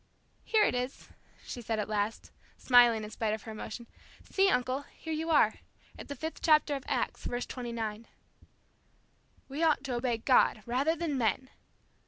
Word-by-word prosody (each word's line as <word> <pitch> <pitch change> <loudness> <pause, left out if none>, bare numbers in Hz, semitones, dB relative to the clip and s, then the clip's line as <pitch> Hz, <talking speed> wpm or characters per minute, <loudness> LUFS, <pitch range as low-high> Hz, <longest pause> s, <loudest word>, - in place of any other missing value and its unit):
"Here 435 -1 +3
it - - +2
is," 250 +2 -4 0.4
she 245 - -6
said 225 -1 -2
at 210 - -2
last, 210 +1 -2 0.3
smiling 240 -3 +5
in 210 - -7
spite 220 -1 -1
of 220 - -12
her 220 - -7
emotion. 235 +2 -7 0.5
"See, 390 0 +4
uncle, 255 0 0 0.2
here 320 - -5
you 320 +1 -3
are, 290 -9 +4 0.4
at - - -10
the 285 - -5
fifth 320 +2 -6
chapter 305 -2 +4
of 275 -2 -4
Acts, - - -2
verse 245 0 -2
29." 230 -3 -5 1.4
"'We 280 +4 -5
ought 305 -5 +3
to 265 -2 -3
obey 240 -1 0
God, 225 -2 +3
rather 270 +7 +1
than 310 -5 -2
men!'" 240 +3 0
250 Hz, 170 wpm, -30 LUFS, 225-290 Hz, 1.4 s, smiling